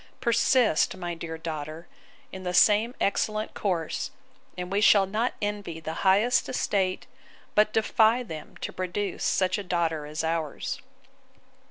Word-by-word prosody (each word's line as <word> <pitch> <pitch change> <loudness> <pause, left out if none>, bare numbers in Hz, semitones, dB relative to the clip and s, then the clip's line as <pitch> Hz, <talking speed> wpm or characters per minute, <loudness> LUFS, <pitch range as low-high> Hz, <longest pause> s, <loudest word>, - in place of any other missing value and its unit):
Persist, 235 -6 +3
my 175 -2 -4
dear 165 -1 -6
daughter, 160 0 -6 0.4
in 190 - -7
the 180 -1 -3
same 215 +6 +4
excellent 215 +2 0
course; 175 -6 -2 0.5
and 180 0 -5
we 200 +1 +1
shall 205 -2 +6
not 220 +6 -1
envy 205 -5 -3
the 160 0 -5
highest 205 +6 +3
estate, 190 -6 0 0.5
but 210 0 +4
defy 220 +2 +3
them 160 -9 -9
to - - -4
produce 185 +1 -3
such 185 +1 +1
a - - -4
daughter 165 -4 -1
as 155 +2 -4
ours. 160 -2 -2
190 Hz, 140 wpm, -27 LUFS, 165-215 Hz, 0.5 s, shall